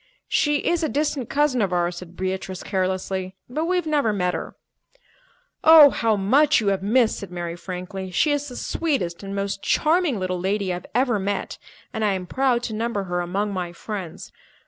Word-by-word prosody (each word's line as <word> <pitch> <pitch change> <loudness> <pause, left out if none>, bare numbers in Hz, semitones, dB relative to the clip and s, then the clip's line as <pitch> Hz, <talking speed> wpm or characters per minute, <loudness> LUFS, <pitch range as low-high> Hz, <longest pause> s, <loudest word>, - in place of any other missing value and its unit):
"She 295 -1 +1
is 345 0 +2
a 315 - 0
distant 290 -4 -1
cousin 285 -4 +2
of 195 -3 0
ours," 175 0 0
said 175 0 -10
Beatrice 190 0 -3
carelessly, 185 0 -2
"but 305 +6 -2
we've 360 0 0
never 290 -7 +1
met 180 -3 0
her." - - -5 1.1
"Oh, 315 -3 +9
how 225 -2 +1
much 265 +10 +4
you 210 -3 +1
have 195 -1 0
missed!" 225 +3 +2
said 200 - -8
Mary 175 -1 -5
frankly. 185 +1 -6
"She 290 - +2
is 290 0 -1
the 250 - -8
sweetest 265 - -2
and 195 0 -6
most 200 0 -2
charming 315 - +2
little 185 -1 -2
lady 195 +1 -1
I - - -2
have 180 - -11
ever 245 -4 +2
met, 195 0 -3 0.3
and 220 -2 -2
I 205 -2 +2
am 185 -1 -3
proud 250 +3 +1
to 225 - -3
number 220 -2 -2
her 175 -1 -2
among 200 +4 -2
my 180 -2 -4
friends. 185 -2 -7
200 Hz, 190 wpm, -23 LUFS, 185-270 Hz, 1.1 s, Oh